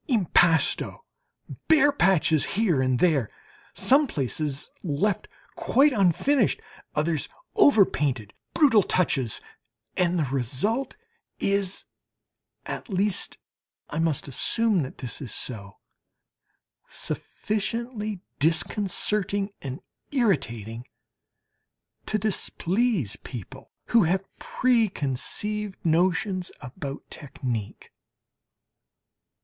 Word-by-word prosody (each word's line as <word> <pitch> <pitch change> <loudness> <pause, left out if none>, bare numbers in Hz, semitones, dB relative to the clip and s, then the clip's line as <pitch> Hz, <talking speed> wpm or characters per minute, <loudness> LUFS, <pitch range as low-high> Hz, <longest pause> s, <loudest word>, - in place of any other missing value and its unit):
Impasto 180 - +2 0.6
bare 305 -2 +5
patches 175 - +3
here 185 -11 +2
and 130 -1 +2
there 140 - +2 0.5
some 280 +3 +4
places 140 - -2
left 180 +5 -1 0.3
quite 285 +3 +3
unfinished 215 - +2 0.4
others 155 0 0 0.3
overpainted 150 - +3 0.2
brutal 265 -9 +6
touches, 140 - +1 0.5
and 180 -1 +1
the 160 - +2
result 135 - -1 0.4
is 200 -1 0 0.8
(at - - -6
least 195 0 -1 0.5
I 150 - -2
must 160 -4 0
assume 210 - +2
that 130 - -6
this 125 +1 -7
is 130 - -6
so) 100 -5 -5 1.1
sufficiently 215 -1 -3 0.2
disconcerting 195 +4 +1
and 135 -1 -6 0.3
irritating 120 - -1 1.2
to 215 - +1
displease 195 - 0
people 120 -8 -9 0.2
who 230 -6 +5
have 190 +4 0
pre 240 -4 +2
conceived 200 +8 -2
notions 180 +3 +1
about 140 +1 -7
technique. 125 -7 -5
180 Hz, 85 wpm, -26 LUFS, 140-215 Hz, 1.2 s, brutal